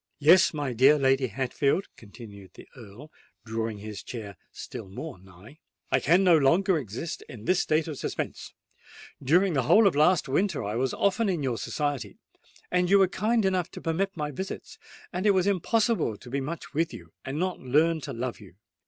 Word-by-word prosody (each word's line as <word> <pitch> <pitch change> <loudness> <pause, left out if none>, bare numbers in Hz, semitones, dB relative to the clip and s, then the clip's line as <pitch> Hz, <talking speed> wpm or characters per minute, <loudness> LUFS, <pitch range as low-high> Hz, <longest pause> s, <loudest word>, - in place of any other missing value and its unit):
"Yes, 165 +5 +6
my 145 -5 -3
dear 135 +6 +5
Lady 135 -1 +2
Hatfield," 135 - -1
continued 100 -4 -13
the - - -13
Earl, 120 +5 -13 0.3
drawing 110 -1 -3
his 105 0 -8
chair 105 -5 -8 0.2
still 95 - -8
more 130 - -8
nigh,—"I 95 - -6
can 175 +6 +3
no 180 -3 +6
longer 170 +5 +3
exist 125 - -6
in 110 -3 -10
this 185 -1 +2
state 155 +1 +1
of 155 -3 -6
suspense. - - -5 0.7
During 175 +7 +3
the 140 - +2
whole 210 - +5
of 195 - +3
last 155 +2 +3
winter 180 - 0
I 105 +1 -3
was 125 +2 -1
often 200 +2 +1
in 170 -6 -1
your 125 -4 -1
society: 145 -3 -3 0.6
you 180 +2 +4
were 190 -1 +5
kind 215 +4 0
enough 185 -3 0
to - - -9
permit 180 +4 -2
my 150 -1 -3
visits—and 190 +3 -6
it 200 - +4
was 185 -1 +2
impossible 200 - +1
to 125 - -13
be 140 +1 -1
much 155 +4 -6
with 165 +2 -1
you, - - -13
and 135 +2 -5
not 185 +2 -2
learn 155 +5 +2
to - - -6
love 120 +1 -4
you. 95 -5 -15
150 Hz, 180 wpm, -27 LUFS, 120-180 Hz, 0.7 s, Yes